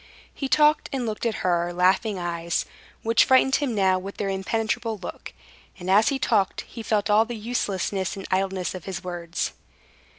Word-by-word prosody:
He 275 - -4
talked 300 +1 +4
and 265 -4 -2
looked 220 +1 -2
at 220 - -3
her 175 -1 +1
laughing 190 +4 +2
eyes, 170 -1 -2 0.4
which 230 +1 +4
frightened 265 +1 +4
him 275 -6 -1
now 190 -2 +3
with 195 +2 -8
their 200 - -2
impenetrable 220 +3 -1
look, 185 - -8 0.5
and, 180 +1 -3
as 210 +3 +5
he 275 - 0
talked, 210 -7 +1
he 230 - -9
felt 210 -1 0
all 215 +2 +6
the 235 +1 -6
uselessness 200 -5 -2
and 195 - -7
idleness 190 -1 0
of 185 -3 -8
his 190 0 -5
words. 175 -1 -3
200 Hz, 175 wpm, -25 LUFS, 185-225 Hz, 0.5 s, all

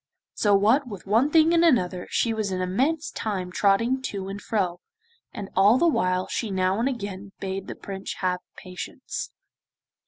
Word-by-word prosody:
So 205 -2 +3
what 225 +8 +3
with 200 -6 -8
one 225 +8 +3
thing 320 +1 +5
and 335 0 +4
another 185 - +2
she 230 - +1
was 215 -2 -1
an 185 - -2
immense 265 - 0
time 190 -4 -3
trotting 230 +8 +2
to 195 -1 -5
and 200 +1 -6
fro, 185 -5 -1 0.5
and 205 -5 -6
all 205 +5 +6
the 340 - +3
while 185 - +1
she 225 - -2
now 190 +1 +1
and 245 +4 +2
again 200 -5 -6
bade 195 0 -4
the - - -6
Prince 195 -1 -6
have 180 -1 -1 0.2
patience. 185 +7 -6
200 Hz, 175 wpm, -25 LUFS, 185-245 Hz, 0.5 s, all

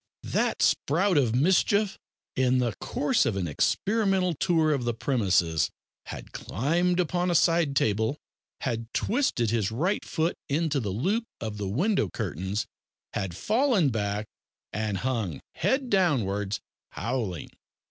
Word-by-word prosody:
That - - 0
sprout 180 +6 +2
of 125 -6 +3
mischief, 190 +7 +2 0.4
in 130 -1 +3
the 120 -3 +1
course - - +1
of - - 0
an 95 -3 -1
experimental 195 - +1
tour 160 0 +2
of 135 -4 -1
the 120 -1 -1
premises, 95 - +1 0.4
had - - -8
climbed 175 - 0
upon 180 +1 +1
a 175 - +1
side 165 -4 +3
table, 110 +3 +1 0.4
had 115 -2 -3
twisted 210 - +1
his 110 -4 +1
right 175 - 0
foot 165 0 0 0.2
into 150 0 +1
the 110 -5 -3
loop 190 - 0
of 110 -2 -5
the 100 - -2
window 150 - +1
curtains, 95 +7 -3 0.5
had 95 -3 -3
fallen 220 - +2
back, 105 -2 -2 0.5
and 105 -1 -1
hung, 110 - -1
head 265 -2 0
downwards, 110 - +1 0.3
howling. 115 - -3
130 Hz, 135 wpm, -27 LUFS, -, 0.5 s, of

